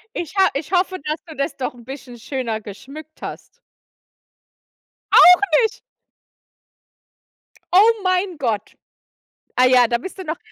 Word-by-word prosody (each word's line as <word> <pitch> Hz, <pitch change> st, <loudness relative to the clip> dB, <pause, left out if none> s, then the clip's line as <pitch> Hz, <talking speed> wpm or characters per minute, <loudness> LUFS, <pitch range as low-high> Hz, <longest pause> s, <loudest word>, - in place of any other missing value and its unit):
Ich 345 Hz, +3 st, -5 dB
ha 385 Hz, -1 st, +4 dB
ich 295 Hz, +5 st, -5 dB
hoffe, 370 Hz, +1 st, +1 dB
dass 305 Hz, +1 st, -3 dB
du 315 Hz, -3 st, -11 dB
das 275 Hz, +3 st, -2 dB
doch 255 Hz, -, -4 dB
bisschen 265 Hz, -2 st, -9 dB
'n -, -, -15 dB
schöner 235 Hz, -3 st, -4 dB
geschmückt 275 Hz, +10 st, -12 dB
hast. 485 Hz, -, -9 dB, 1.5 s
Auch 360 Hz, +1 st, +8 dB, 0.2 s
nicht. 450 Hz, +2 st, -2 dB, 1.9 s
Oh 415 Hz, +5 st, +7 dB
mein 370 Hz, -1 st, 0 dB
Gott. 225 Hz, -7 st, -3 dB, 0.8 s
Ah 255 Hz, -, +4 dB
ja, 250 Hz, -1 st, +5 dB
da 235 Hz, -, 0 dB
bist 375 Hz, +11 st, -9 dB
du -, -, -5 dB
noch 320 Hz, -1 st, -4 dB
305 Hz, 135 wpm, -20 LUFS, 255-365 Hz, 1.9 s, Auch